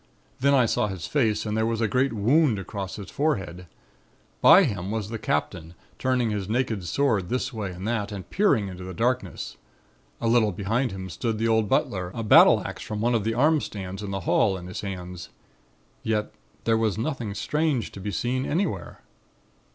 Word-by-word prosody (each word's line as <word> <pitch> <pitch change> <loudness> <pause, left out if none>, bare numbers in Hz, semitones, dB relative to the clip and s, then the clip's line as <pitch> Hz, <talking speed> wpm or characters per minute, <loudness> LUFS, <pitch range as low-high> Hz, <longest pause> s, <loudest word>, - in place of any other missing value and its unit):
Then 140 +2 +4
I 125 -3 +5
saw 105 - +1
his 95 -4 -5
face 115 -8 +1
and 105 0 -2
there 110 - +1
was 115 -1 -1
a 115 - +2
great 130 +6 +1
wound 120 +4 +3
across 95 0 -5
his 100 - -8
forehead. 95 - -2 0.7
By - - +8
him 95 -2 -2
was 105 -1 -3
the 115 -1 -4
Captain, 80 +1 -2 0.2
turning 125 -3 +1
his 100 -2 -3
naked 115 -4 0
sword 105 -4 +1
this 130 +1 -2
way 105 -4 -3
and 90 +3 -6
that, 110 -3 -1
and 100 -3 -7
peering 190 - +2
into 90 -1 -8
the 95 0 -7
darkness; 125 +2 -2 0.6
a 115 - -1
little 115 -2 +4
behind 110 +7 -1
him 95 -1 -6
stood 110 +6 -2
the 115 +1 0
old 110 -2 +2
butler, 90 -2 0
a 115 - -3
battle 105 - +7
axe - - -6
from 105 -1 -5
one 120 +3 +1
of 115 -3 +1
the 115 +1 -1
arm 150 +4 +3
stands 95 -1 -6
in 105 - -5
the 95 0 -3
hall 95 +2 +2
in 90 - -9
his 90 - -6
hands. 90 -3 -6 0.7
Yet 105 -1 -1 0.3
there 115 -1 +2
was 110 -3 0
nothing 115 -4 -3
strange 150 +4 0
to - - -10
be 100 +2 -4
seen 120 +7 -1
anywhere. 155 - -2
110 Hz, 195 wpm, -25 LUFS, 95-120 Hz, 0.7 s, By